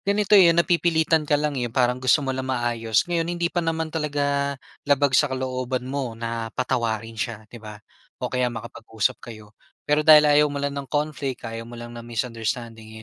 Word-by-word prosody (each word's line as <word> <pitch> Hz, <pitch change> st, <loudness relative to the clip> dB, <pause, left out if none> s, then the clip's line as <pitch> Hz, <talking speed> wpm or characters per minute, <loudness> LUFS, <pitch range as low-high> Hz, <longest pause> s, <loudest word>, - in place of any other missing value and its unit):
ganito, 200 Hz, +1 st, -1 dB
eh, 190 Hz, -4 st, +8 dB
napipilitan 165 Hz, -2 st, +2 dB
ka 145 Hz, -, +4 dB
lang, 150 Hz, 0 st, -1 dB
eh, 120 Hz, -, -1 dB
parang 125 Hz, +1 st, +1 dB
gusto 130 Hz, +3 st, +3 dB
mo 135 Hz, -, -1 dB
lang 130 Hz, 0 st, -4 dB
maayos. 120 Hz, -3 st, 0 dB
Ngayon 170 Hz, -1 st, -1 dB
hindi 170 Hz, 0 st, 0 dB
pa 175 Hz, -, +1 dB
naman 160 Hz, -1 st, -2 dB
talaga 140 Hz, -2 st, -1 dB, 0.3 s
labag 145 Hz, -1 st, +3 dB
sa 145 Hz, +2 st, +4 dB
kalooban 130 Hz, -1 st, -3 dB
mo 130 Hz, -3 st, -3 dB
na 115 Hz, 0 st, -4 dB
patawarin 115 Hz, -3 st, -2 dB
siya, 110 Hz, -2 st, -4 dB
'di 120 Hz, -, -10 dB
ba? 105 Hz, -1 st, -9 dB, 0.5 s
O 125 Hz, -, -2 dB
kaya 125 Hz, -1 st, +1 dB
makapag-usap 110 Hz, -2 st, -3 dB
kayo. 110 Hz, -2 st, -12 dB, 0.3 s
Pero 150 Hz, +1 st, +2 dB
dahil 155 Hz, -1 st, +9 dB
ayaw 150 Hz, 0 st, +5 dB
mo 140 Hz, -1 st, -5 dB
lang 140 Hz, -, -1 dB
ng 140 Hz, -, -6 dB
conflict, 145 Hz, -3 st, -3 dB
ayaw 115 Hz, 0 st, -7 dB
mo 120 Hz, -, -10 dB
lang 120 Hz, 0 st, -8 dB
ng 120 Hz, 0 st, -9 dB
misunderstanding, 115 Hz, -1 st, -5 dB
130 Hz, 190 wpm, -23 LUFS, 115-150 Hz, 0.5 s, dahil